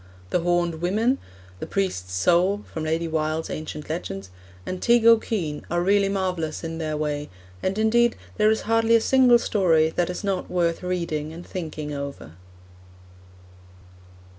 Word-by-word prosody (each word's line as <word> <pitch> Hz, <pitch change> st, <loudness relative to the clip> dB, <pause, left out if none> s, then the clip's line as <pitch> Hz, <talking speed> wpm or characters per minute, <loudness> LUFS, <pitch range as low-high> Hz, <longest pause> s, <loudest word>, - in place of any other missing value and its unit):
The -, -, +2 dB
Horned 175 Hz, -1 st, 0 dB
Women, 220 Hz, +9 st, +1 dB, 0.4 s
The -, -, -5 dB
Priest's 180 Hz, -, -2 dB
Soul, 180 Hz, -, +2 dB
and 155 Hz, -1 st, -2 dB, 1.9 s
Teig 235 Hz, -1 st, +4 dB
O'Kane, 215 Hz, -9 st, +2 dB
are 175 Hz, +1 st, 0 dB
really 200 Hz, +1 st, +3 dB
marvellous 180 Hz, -6 st, -2 dB
in 165 Hz, 0 st, -5 dB
their 155 Hz, -1 st, -2 dB
way; 150 Hz, -1 st, -2 dB, 0.3 s
and, 190 Hz, +2 st, -1 dB
indeed, 235 Hz, +2 st, +3 dB, 0.2 s
there 215 Hz, 0 st, +4 dB
is 220 Hz, -, +1 dB
hardly 225 Hz, +1 st, +3 dB
a -, -, +6 dB
single 255 Hz, -1 st, +5 dB
story 165 Hz, -8 st, +2 dB
that 175 Hz, +1 st, 0 dB
is 180 Hz, -, -5 dB
not 195 Hz, -2 st, -2 dB
worth 170 Hz, -2 st, 0 dB
reading 170 Hz, -4 st, -2 dB
and 170 Hz, +2 st, -9 dB
thinking 155 Hz, -4 st, -5 dB
over. 140 Hz, -, -6 dB
180 Hz, 130 wpm, -24 LUFS, 160-215 Hz, 1.9 s, a